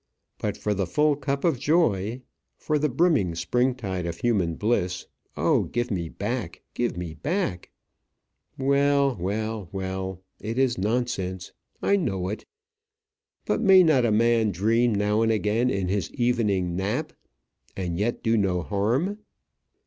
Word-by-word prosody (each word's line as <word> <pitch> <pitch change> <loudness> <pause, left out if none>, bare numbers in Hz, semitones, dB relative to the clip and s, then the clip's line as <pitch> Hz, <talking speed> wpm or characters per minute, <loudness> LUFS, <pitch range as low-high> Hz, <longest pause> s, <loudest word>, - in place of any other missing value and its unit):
But - - -2
for 105 - -1
the 95 -2 -1
full 150 - +2
cup 140 -1 -3
of 165 -8 +2
joy, 125 - +1 0.3
for 150 -1 0
the 150 +1 +1
brimming 135 - +2
spring 125 +8 +1
tide 95 -7 -4
of 85 -1 -4
human 95 -9 +1
bliss, 95 -4 0 0.3
oh, - - +2
give 120 0 -2
me 85 -4 -2
back, 105 -3 -4
give 120 -6 -1
me 85 -3 -5
back! 145 - -2 0.9
Well, 140 0 +2
well, 105 +1 -3
well; 95 -1 -4 0.2
it 115 +3 -4
is 130 -2 +2
nonsense; 95 -4 -2 0.3
I 200 - +4
know 95 - -1
it; 105 - -5 1.0
but - - 0
may 190 -4 +7
not 155 -7 +4
a 115 - +2
man 115 0 +3
dream 110 +5 +2
now 105 +2 +1
and 115 0 +3
again 110 +3 +1
in 100 -5 -1
his 95 -2 -1
evening 105 -8 +1
nap 95 +3 -2 0.6
and 90 -3 -2
yet 115 +3 -1
do 115 0 +2
no 90 -4 +1
harm? 120 - 0
110 Hz, 150 wpm, -25 LUFS, 95-130 Hz, 1.0 s, may